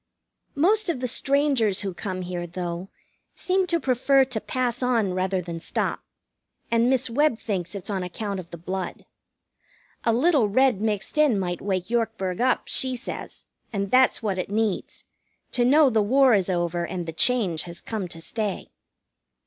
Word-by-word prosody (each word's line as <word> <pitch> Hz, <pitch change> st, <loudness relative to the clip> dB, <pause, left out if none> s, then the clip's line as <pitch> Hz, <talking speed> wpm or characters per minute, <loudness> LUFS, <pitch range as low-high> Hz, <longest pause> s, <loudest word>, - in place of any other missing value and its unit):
Most 395 Hz, +7 st, +3 dB
of 325 Hz, -, -1 dB
the 250 Hz, -, -1 dB
strangers 270 Hz, -6 st, +2 dB
who 195 Hz, -2 st, -3 dB
come 185 Hz, 0 st, -4 dB
here, 175 Hz, -1 st, -4 dB
though, 175 Hz, +1 st, -5 dB, 0.5 s
seem 375 Hz, 0 st, +1 dB
to 340 Hz, -1 st, +1 dB
prefer 270 Hz, 0 st, +3 dB
to 245 Hz, -4 st, -3 dB
pass 250 Hz, -1 st, -2 dB
on 230 Hz, -7 st, +1 dB
rather 185 Hz, 0 st, 0 dB
than 170 Hz, -1 st, -6 dB
stop, -, -, -2 dB, 0.7 s
and 235 Hz, +1 st, +3 dB
Miss 265 Hz, -1 st, +2 dB
Webb 255 Hz, +1 st, +2 dB
thinks 185 Hz, -5 st, -4 dB
it's 200 Hz, +1 st, -5 dB
on 195 Hz, -2 st, -1 dB
account 195 Hz, +2 st, -4 dB
of 170 Hz, -2 st, -9 dB
the 170 Hz, -, -8 dB
blood. 185 Hz, +2 st, -5 dB, 1.0 s
A 230 Hz, -, +3 dB
little 255 Hz, -2 st, +3 dB
red 255 Hz, -1 st, +3 dB
mixed 215 Hz, +6 st, -2 dB
in 290 Hz, -8 st, +4 dB
might 175 Hz, -2 st, -2 dB
wake 190 Hz, 0 st, -2 dB
Yorkburg 225 Hz, -5 st, -1 dB
up, 255 Hz, 0 st, +2 dB
she 260 Hz, -1 st, 0 dB
says, 240 Hz, -, -7 dB, 0.3 s
and 200 Hz, -2 st, -2 dB
that's 255 Hz, -2 st, +4 dB
what 195 Hz, -3 st, -1 dB
it 185 Hz, -, -3 dB
needs 215 Hz, -1 st, -2 dB, 0.5 s
to 245 Hz, -, +1 dB
know 280 Hz, +2 st, +5 dB
the 220 Hz, -2 st, +3 dB
war 260 Hz, +4 st, +4 dB
is 195 Hz, -3 st, +2 dB
over 175 Hz, -1 st, 0 dB
and 175 Hz, 0 st, -4 dB
the 165 Hz, -, -5 dB
change 190 Hz, -5 st, +1 dB
has 170 Hz, 0 st, -7 dB
come 215 Hz, -5 st, -4 dB
to 165 Hz, -1 st, -9 dB
stay. 210 Hz, +2 st, -3 dB
215 Hz, 175 wpm, -25 LUFS, 185-255 Hz, 1.0 s, know